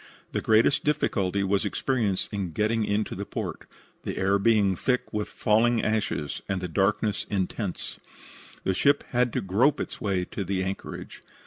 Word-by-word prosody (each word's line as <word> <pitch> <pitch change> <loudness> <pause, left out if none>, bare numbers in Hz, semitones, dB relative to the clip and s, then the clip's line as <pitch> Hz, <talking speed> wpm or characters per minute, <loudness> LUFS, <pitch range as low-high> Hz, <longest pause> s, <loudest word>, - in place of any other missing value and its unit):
The - - -1
greatest 110 +6 +4
difficulty 100 -9 +1
was 100 0 +1
experienced 110 -7 0
in 95 -5 -3
getting 110 +2 +1
into 105 +1 -1
port, - - -5 0.3
the - - -5
air 100 +1 +2
being 100 -2 +3
thick 125 +5 -1
with 105 -1 -1
falling 115 +2 +2
ashes 105 -9 -1
and 95 -1 0
the 90 - -3
darkness 100 +4 +1
intense. 95 0 -3 0.6
The 95 - +1
ship 140 +9 +3
had 125 -1 +2
to - - 0
grope 120 +10 +2
its - - -5
way 95 -3 0
to 100 - -4
the 95 0 -1
anchorage. 95 +1 -6
105 Hz, 155 wpm, -27 LUFS, 95-115 Hz, 0.6 s, greatest